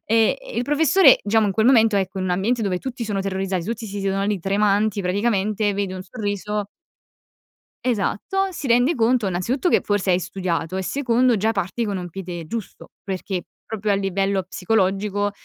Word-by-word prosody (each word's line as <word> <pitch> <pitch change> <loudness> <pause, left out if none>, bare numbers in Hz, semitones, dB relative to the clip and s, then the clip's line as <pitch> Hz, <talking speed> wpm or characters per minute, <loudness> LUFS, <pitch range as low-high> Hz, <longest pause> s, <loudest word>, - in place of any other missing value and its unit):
e 225 - +3
e - - -10
il 240 - +1
professore, 315 +6 +5
diciamo, 215 +1 +3
in 195 - 0
quel 220 +4 +2
momento, 225 -5 +5
ecco, 190 0 -1
in 185 - -2
un 180 - -1
ambiente 220 +6 0
dove 185 -3 0
tutti 250 0 -5
sono 205 -2 -2
terrorizzati, 190 -2 -2
tutti 230 +2 -4
si 200 0 -5
siedono 195 0 0
lì 205 -1 0
tremanti 205 +1 +1
praticamente, 205 +1 0
vede 195 -2 -2
un 185 - -6
sorriso 205 0 -3 1.2
Esatto, 255 - 0
si 325 -6 -6
rende 245 +6 +3
conto 230 -2 +2
innanzitutto 235 - 0
che - - +4
forse 205 -2 0
hai 180 - +4
studiato, 180 -1 -3
e 190 - -1
secondo 245 +3 +2
già 220 +3 +1
parti 195 +3 -2
con 200 -2 -2
un 180 -1 -5
piede 175 -2 -6
giusto, 225 +2 -7 0.2
perché 190 -1 -4 0.2
proprio 215 -2 -2
a - - +3
livello 195 0 0
psicologico, 200 +2 0
205 Hz, 185 wpm, -22 LUFS, 190-225 Hz, 1.2 s, professore